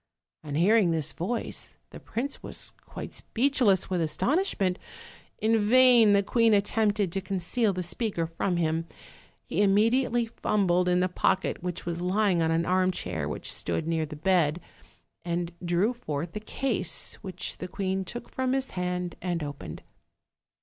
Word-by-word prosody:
On 145 -2 -5
hearing 195 +4 +4
this 155 -3 0
voice 225 +8 -3
the - - -9
prince 255 +6 -4
was - - -4 0.2
quite - - -7
speechless 240 -6 +2
with 180 -2 -1
astonishment. 195 - 0 0.6
In 220 0 +2
vain 245 -4 +7
the 200 0 +4
queen 230 +1 +3
attempted 205 -1 +1
to 195 - -2
con 190 0 -3
ceal 210 +5 +1
the 185 -1 -3
speaker 175 0 -1
from 170 +2 -2
him: 165 0 0 0.6
he 195 - -1
immediately 230 +4 +3
fumbled 185 -5 +1
in 180 0 +3
the 185 - +2
pocket 185 +1 0
which 180 -1 -4
was 170 0 -3
lying 185 -1 +2
on 160 - +2
an 165 +1 +1
armchair 180 - 0
which - - -3
stood 160 - -2
near 160 -1 0
the 155 - -8
bed, 170 -1 +2 0.6
and 170 0 -2
drew 175 +7 +1
forth 165 - -5
the 210 - -3
case, 215 -3 -1
which 185 -3 -4
the 180 - -5
queen 190 0 -2
took 240 +5 -8
from 260 0 0
his 270 0 -1
hand 180 -1 -2
and 175 -3 -2
opened. 145 -1 -7
185 Hz, 155 wpm, -27 LUFS, 170-220 Hz, 0.6 s, vain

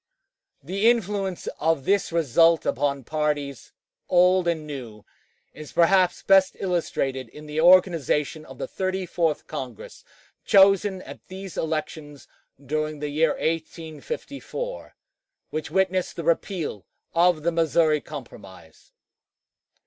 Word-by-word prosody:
The 200 +5 +2
influence 200 -5 -1
of 160 -4 +1
this 200 -2 +1
result 165 +1 +3
upon 140 -2 -1
parties, 145 -2 -3 0.4
old 180 0 +4
and 160 -3 -1
new, 120 -8 -8 0.5
is 155 -2 -11
perhaps 180 +1 +3
best 195 -1 +4
illustrated 135 -8 -2
in 150 +6 -12
the 150 +1 -2
organization 165 -4 +3
of 135 -3 -13
the - - -4
Thirty 190 0 -2
fourth 165 -3 -1
Congress, 125 -5 -8 0.4
chosen 195 -1 +4
at - - -12
these 190 0 -8
elections 155 -3 -4 0.3
during 155 +2 -3
the 150 0 -4
year 150 +1 +2
1854, 165 - -5 0.6
which 155 - -4
witnessed 190 -1 0
the 170 - -5
repeal 170 - -2 0.3
of 170 -2 +3
the 170 - +2
Missouri 160 -2 +2
Compromise. 95 - -12
165 Hz, 115 wpm, -24 LUFS, 150-185 Hz, 0.6 s, old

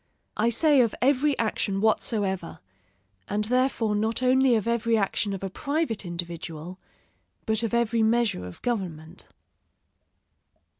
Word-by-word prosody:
I 225 +2 +2
say 285 +3 +4
of 230 -3 +1
every 280 +2 +2
action 210 -3 -1
whatsoever; 205 -4 0 0.7
and 210 +1 -1
therefore 240 -2 +1
not 220 +4 -1
only 260 0 +4
of 220 0 -1
every 230 -1 +1
action 200 0 0
of 195 -1 -5
a 195 - -2
private 280 - -2
individual, 170 0 -6 0.7
but 220 -1 +1
of 230 - -2
every 235 -1 +1
measure 220 - +1
of 90 - -12
government. 180 -10 -4
220 Hz, 130 wpm, -26 LUFS, 195-240 Hz, 0.7 s, say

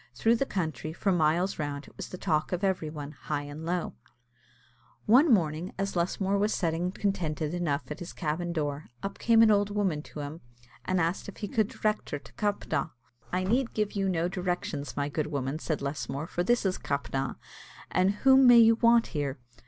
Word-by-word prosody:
Through 230 - +3
the 275 - 0
country, 160 -3 -3
for 195 +4 0
miles 175 +3 +2
round, 145 -1 -4
it - - -17
was - - -7
the 185 - -7
talk 155 -5 0
of 180 +1 -2
every 185 -5 0
one, 150 -2 -7
high 150 -1 -4
and 145 +2 -8
low. 175 +1 -2 1.1
One 260 +8 +6
morning, 165 -3 +1
as 195 0 -2
Lusmore 190 +3 0
was 210 +2 +1
sitting 170 +1 0
contented 170 -6 -2
enough 160 -5 -2
at 150 - -5
his 175 - -7
cabin 170 +1 -2
door, 150 -2 -3 0.2
up 195 - -5
came 230 -1 +5
an 220 - +6
old 205 0 +3
woman 195 -7 0
to 150 - -8
him, 145 +3 -7 0.4
and 185 -1 +1
asked 170 +2 -1
him - - -8
if - - -15
he 205 - -2
could 220 -2 +1
direct 215 0 -2
her 145 - -2
to 145 - -16
Cappagh. 200 -8 -1 0.4
"I 180 +1 0
need 235 +6 0
give 210 -1 0
you 195 -1 0
no 170 -2 +1
directions, 175 -7 -3
my 140 0 0
good 150 +1 -2
woman," 140 0 -2
said 155 -3 -2
Lusmore, 140 +1 -3
"for 175 +1 -2
this 240 +3 +2
is 185 -1 0
Cappagh; 135 -2 -2 0.6
and 185 +2 +3
whom 265 -1 +7
may 245 -1 +9
you 225 -1 +7
want 235 0 +5
here?" 145 -3 -2
175 Hz, 200 wpm, -29 LUFS, 150-200 Hz, 1.1 s, may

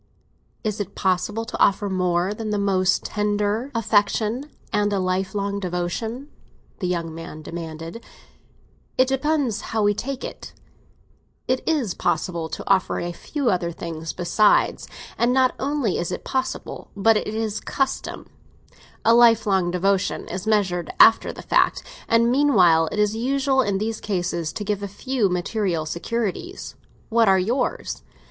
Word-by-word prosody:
"Is 215 -2 -2
it 200 -1 -5
possible 205 +4 0
to - - -6
offer 200 +1 +3
more 180 0 0
than 215 0 -5
the 210 - 0
most 190 -2 +1
tender 210 +3 -1
affection 220 +4 +1 0.2
and 205 0 +2
a 200 - +1
lifelong 190 +2 -1
devotion?" 200 - -3 0.5
the 185 - -1
young 170 -2 -2
man 165 -1 -8
demanded. 165 +5 -7 0.9
"It 255 - +4
depends 270 -5 0
how 220 -1 -1
we 205 0 +4
take 265 +5 -5
it. - - -8 0.9
It 255 0 +1
is 270 - +1
possible 170 -3 -1
to - - -7
offer 190 -1 +2
a 175 - -3
few 260 - -2
other 175 -2 -1
things 165 -1 -5
besides; 205 +4 +2 0.3
and 240 +1 +3
not 260 -1 +3
only 275 -7 0
is 175 +1 -2
it 180 - -4
possible, 260 0 -3
but 225 +3 +4
it's 215 0 -2
usual. 270 -1 -2 0.8
A 230 - +6
lifelong 220 -6 +4
devotion 185 +2 0
is 185 +4 -5
measured 190 -6 +1
after 225 - +7
the - - -10
fact; - - +2 0.2
and 230 +1 +3
meanwhile 185 - +4
it - - -4
is 210 -1 +3
customary 265 0 +1
in 195 - +1
these 220 +2 -3
cases 175 -5 -2
to 210 - -4
give 205 -1 -2
a 200 - -3
few 220 +2 -1
material 180 -2 -1
securities. 230 - -3 0.4
What 230 -1 +3
are 190 - +5
yours? 240 +7 -1
205 Hz, 145 wpm, -23 LUFS, 180-230 Hz, 0.9 s, after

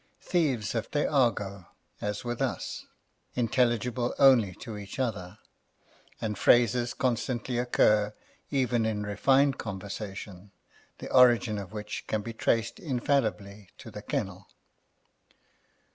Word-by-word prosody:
Thieves 140 - 0
have 115 -2 -3
their 145 0 0
argot, 105 -9 +1 0.4
as 105 0 -3
with 120 -1 -3
us, - - -3 0.5
intelligible 120 0 +1
only 120 -9 +5
to 115 -3 -8
each 100 -1 -8
other; 110 -7 -3 0.8
and 105 -3 -3
phrases 120 +1 +3
constantly 125 -1 -1
occur, 105 -4 +3 0.4
even 125 -5 +1
in 105 -2 -2
refined 135 +7 +2
conversation, 100 -1 -7 0.5
the - - -5
original 120 -5 +5
of 90 - -19
which 105 -1 -6
can 110 -1 -1
be 115 - -6
traced 115 0 0
infallibly 110 - -1
to - - -11
the - - -8
kennel. - - -4
115 Hz, 115 wpm, -28 LUFS, 105-125 Hz, 0.8 s, only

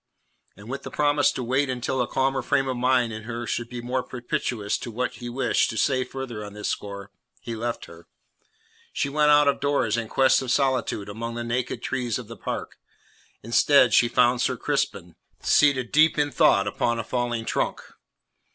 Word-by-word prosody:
And 105 - -13
with 135 +3 -5
the - - -7
promise 145 -1 +2
to 125 - -4
wait 130 +3 0
until 130 +1 -1
a 120 - 0
calmer 135 0 0
frame 135 +2 +1
of 130 - -1
mind 125 -2 +2
in 110 - -6
her 120 0 -5
should 120 +1 -3
be 120 -1 -6
more 125 +1 -1
propitious 120 -4 -3
to - - -6
what 125 +3 -3
he 120 -1 -7
wished 130 +2 +1
to 110 - -5
say 130 +4 +2
further 130 -4 -6
on 105 -1 -9
this 105 0 -5
score, 100 -1 -5 0.3
he 115 - -6
left 120 +1 -4
her. 85 0 -15 0.8
She 140 - -1
went 150 +1 +2
out 145 0 +6
of 140 - +2
doors 140 -6 +1
in 115 -1 -3
quest 135 +4 +3
of 130 - -5
solitude 130 -7 0
among 115 +3 -5
the 120 - -3
naked 120 +1 -3
trees 125 -4 -2
of 125 -4 -8
the 115 - -9
park; - - -6 0.6
instead 125 +3 +4
she 120 - +5
found 120 +1 +3
Sir 125 0 0
Crispin, 100 - -2 0.3
seated 135 -5 +3
deep 155 +1 +4
in 145 -1 +1
thought - - +4
upon 120 -1 -1
a 115 - -2
fallen 120 -1 -2
trunk. - - -2
125 Hz, 195 wpm, -25 LUFS, 115-135 Hz, 0.8 s, out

